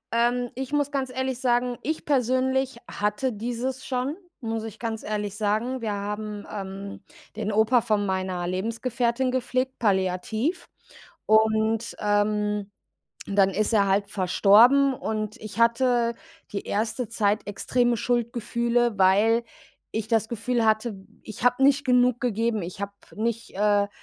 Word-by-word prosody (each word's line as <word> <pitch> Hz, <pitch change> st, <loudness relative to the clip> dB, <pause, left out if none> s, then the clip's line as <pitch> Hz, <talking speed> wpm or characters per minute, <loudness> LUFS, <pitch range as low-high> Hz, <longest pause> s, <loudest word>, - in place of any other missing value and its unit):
Ähm, 240 Hz, +1 st, +1 dB
ich 265 Hz, +2 st, -5 dB
muss 290 Hz, -1 st, +1 dB
ganz 270 Hz, -2 st, -2 dB
ehrlich 260 Hz, 0 st, -3 dB
sagen, 245 Hz, -1 st, +1 dB
ich 315 Hz, +1 st, -3 dB
persönlich 260 Hz, -1 st, +1 dB
hatte 210 Hz, +5 st, -1 dB
dieses 245 Hz, +4 st, -3 dB
schon, 260 Hz, +3 st, -2 dB, 0.3 s
muss 225 Hz, -2 st, -3 dB
ich 220 Hz, -3 st, -7 dB
ganz 225 Hz, -1 st, -4 dB
ehrlich 210 Hz, -1 st, -3 dB
sagen. 220 Hz, +5 st, -1 dB
Wir 215 Hz, -2 st, -2 dB
haben, 210 Hz, +1 st, -5 dB
ähm, 195 Hz, 0 st, -7 dB, 0.3 s
den 215 Hz, 0 st, -2 dB
Opa 220 Hz, +4 st, +4 dB
von 215 Hz, -3 st, 0 dB
meiner 185 Hz, -2 st, -2 dB
Lebensgefährtin 235 Hz, +6 st, -1 dB
gepflegt, 260 Hz, 0 st, -1 dB
palliativ 215 Hz, -, 0 dB, 0.6 s
und, 220 Hz, +1 st, +2 dB
ähm, 210 Hz, 0 st, 0 dB, 0.6 s
dann 195 Hz, -1 st, +3 dB
ist 215 Hz, +3 st, 0 dB
er 200 Hz, -2 st, +4 dB
halt 200 Hz, +1 st, +1 dB
verstorben. 220 Hz, +9 st, +5 dB
Und 215 Hz, -3 st, -3 dB
ich 215 Hz, +1 st, -9 dB
hatte 235 Hz, 0 st, +3 dB, 0.4 s
die 200 Hz, -, -4 dB
erste 220 Hz, +3 st, -1 dB
Zeit 210 Hz, -3 st, 0 dB
extreme 240 Hz, +4 st, +1 dB
Schuldgefühle, 235 Hz, -1 st, 0 dB
weil 210 Hz, +5 st, +4 dB, 0.5 s
ich 220 Hz, 0 st, -3 dB
das 220 Hz, -1 st, +1 dB
Gefühl 235 Hz, +1 st, -1 dB
hatte, 215 Hz, +1 st, +1 dB, 0.3 s
ich 215 Hz, -, -9 dB
habe 245 Hz, +2 st, +3 dB
nicht 280 Hz, 0 st, +4 dB
genug 250 Hz, -1 st, +3 dB
gegeben. 230 Hz, -2 st, 0 dB
Ich 180 Hz, +3 st, -7 dB
habe 200 Hz, 0 st, -4 dB, 0.2 s
nicht, 230 Hz, +1 st, -2 dB
äh, 205 Hz, 0 st, +3 dB
225 Hz, 135 wpm, -25 LUFS, 205-245 Hz, 0.6 s, verstorben